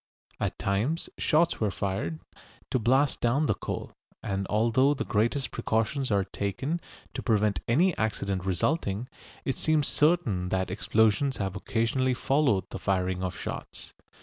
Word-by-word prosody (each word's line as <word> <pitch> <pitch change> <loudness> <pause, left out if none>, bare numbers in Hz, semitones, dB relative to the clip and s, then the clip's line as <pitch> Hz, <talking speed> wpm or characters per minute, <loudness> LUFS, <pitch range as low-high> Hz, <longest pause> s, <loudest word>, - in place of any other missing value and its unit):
At - - -2
times 110 - -1
shots 165 +2 +2
were 110 - +1
fired, 95 -4 -3 0.5
to 130 - +2
blast 130 +5 +2
down 130 +6 +2
the - - +2
coal, - - -5 0.3
and 95 -1 -2
although 120 +6 +3
the - - -3
greatest 120 +5 0
precautions 115 +5 0
are 100 -2 +2
taken 100 - -3 0.3
to - - -4
prevent 105 -5 +2
any 165 +9 +3
accident 100 -4 -1
resulting, 100 - 0 0.4
it 135 - -1
seems 155 -2 +2
certain 135 - +2
that 95 -1 -1
explosions 110 +6 +2
have 95 -1 -2
occasionally 120 +5 0
followed 130 -7 +2
the - - -5
firing 95 -1 0
of 95 -1 -3
shots. - - -7
110 Hz, 145 wpm, -28 LUFS, 100-135 Hz, 0.5 s, although